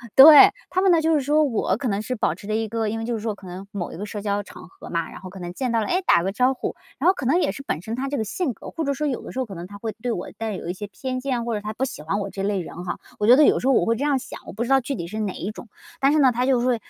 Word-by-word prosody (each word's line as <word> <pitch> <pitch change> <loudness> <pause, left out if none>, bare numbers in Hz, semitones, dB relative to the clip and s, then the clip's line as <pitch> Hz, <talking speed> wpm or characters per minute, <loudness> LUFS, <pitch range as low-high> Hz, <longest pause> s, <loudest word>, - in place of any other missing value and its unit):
对， 290 +2 +10 0.2
他 370 +1 +1
们 385 -2 +4
呢 335 - +5
就 320 +1 +2
是 300 - +3
说 295 +3 +2
我 225 -8 0
可 255 +1 -3
能 200 -1 0
是 255 +4 -3
保 190 -7 0
持 200 - -12
着 215 - -1
一 220 0 -1
个 225 0 -1
因 225 +1 -3
为 225 - -4
就 240 - -2
是 - - -3
说 220 0 -2
可 195 -2 -13
能 180 +2 -8
某 185 -4 -4
一 - - -8
个 205 - -5
社 210 0 -6
交 205 0 -1
场 175 - -12
合 - - -13
嘛， 170 -1 -2
然 - - -10
后 185 - -8
可 190 - -11
能 175 -1 -5
见 250 +5 -2
到 230 - +2
了， 215 - -1
哎， 365 - +1
打 - - +5
个 190 +3 -1
招 255 +4 +3
呼。 260 - -4 0.2
然 315 - +2
后 370 - +6
可 290 - -6
能 295 +8 +3
也 - - +1
是 275 - -8
本 170 - -3
身 220 +4 -4
他 265 +2 -3
这 285 - -2
个 220 - 0
性 275 - -2
格 - - -10
或 325 - -3
者 280 -2 0
说 300 +2 -2
有 260 -4 -2
的 - - -9
时 260 - -5
候 260 - 0
可 195 -5 -9
能 170 +1 -7
他 205 - -10
会 220 0 -4
对 245 0 -1
我 180 - -4
带 225 -1 -3
有 170 - -7
一 175 - -2
些 205 +2 -7
偏 255 +5 -4
见， 250 -3 -2
或 235 -2 -1
者 205 - -3
他 210 - -4
不 265 +4 -1
喜 265 - -7
欢 165 +7 -2
我 200 -1 -3
这 195 0 -5
类 200 -1 0
人 175 0 -7
哈。 175 - -4 0.2
我 210 - +1
觉 245 - +9
得 300 - +7
有 - - +4
时 260 - -2
候 270 - +5
我 - - +3
会 230 - +2
这 255 - -3
样 285 -2 +2
想， - - -9
我 - - -8
不 220 - -2
知 240 - -5
道 270 0 +5
具 275 +3 -3
体 170 -7 -5
是 215 +5 -5
哪 200 -3 -2
一 195 - -5
种， 220 - -11 0.3
但 275 +1 +5
是 310 - +3
呢 265 -3 +5
他 245 +2 0
就 260 -2 +3
会， 250 0 +2
230 Hz, 400 characters per minute, -23 LUFS, 200-270 Hz, 0.3 s, 对